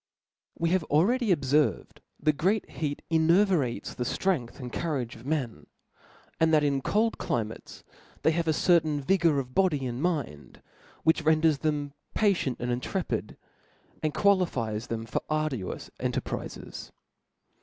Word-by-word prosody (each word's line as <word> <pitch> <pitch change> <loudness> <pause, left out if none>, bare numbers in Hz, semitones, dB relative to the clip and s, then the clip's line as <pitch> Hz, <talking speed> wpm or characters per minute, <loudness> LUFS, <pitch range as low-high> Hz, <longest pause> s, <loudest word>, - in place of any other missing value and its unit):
WE 165 - +1
have 185 -2 +2
already 220 - +2
obferved 145 -2 +1 0.2
that 155 0 +2
great 190 +8 +1
heat 145 -2 -3
enervates 165 - +2
the 125 - -3
ftrength 140 -3 -1
and 125 -2 -7
courage 135 -8 -2
of 115 +4 -12
men, 140 -7 -2 0.7
and 160 0 +4
that 155 -1 +4
in 140 -2 +1
cold 220 - +1
climates 110 -2 -4 0.4
they 160 - +5
have 165 0 -1
a - - +4
certain 155 -2 +3
vigor 165 0 +2
of 130 -2 -3
body 150 -6 +2
and 125 +1 -3
mind, 145 - -3 0.4
which 160 +1 +3
renders 155 -1 +3
them 145 -2 -1 0.2
patidnt 190 - +1
and 125 0 -2
intrepidf 125 - -3 0.7
and 155 -1 -1
qualifies 130 - +1
them 115 -1 -4
for 115 - -2
arduous 155 - -2
cq - - -1
terprizes. - - -6
155 Hz, 140 wpm, -28 LUFS, 130-170 Hz, 0.7 s, they